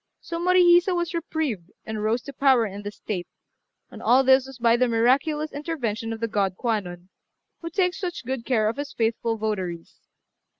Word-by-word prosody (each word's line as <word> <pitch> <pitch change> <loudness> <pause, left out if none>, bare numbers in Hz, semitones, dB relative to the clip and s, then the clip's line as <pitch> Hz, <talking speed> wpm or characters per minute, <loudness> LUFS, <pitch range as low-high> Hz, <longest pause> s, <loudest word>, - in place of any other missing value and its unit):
So 335 0 -5
Morihisa 355 0 +5
was 345 0 -2
reprieved, 305 - -3 0.2
and 220 -1 -4
rose 225 +3 0
to 280 - -9
power 260 -3 +4
in 200 -1 -6
the 205 - -5
state; 195 -4 -5 0.6
and - - -10
all 260 +2 +4
this 265 0 +4
was 270 -2 -11
by 235 -1 +4
the 250 +1 +2
miraculous 275 +7 +1
intervention 245 -8 -3
of 225 - -5
the 230 - -1
god 195 -4 -1
Kwannon, 185 -6 -3 0.5
who 335 - -5
takes 360 +1 0
such 350 -8 -5
good 260 -1 -3
care 225 -4 +1
of 225 - -2
his 285 0 -5
faithful 225 0 -1
votaries. 190 -6 -4
240 Hz, 180 wpm, -24 LUFS, 215-305 Hz, 0.6 s, Morihisa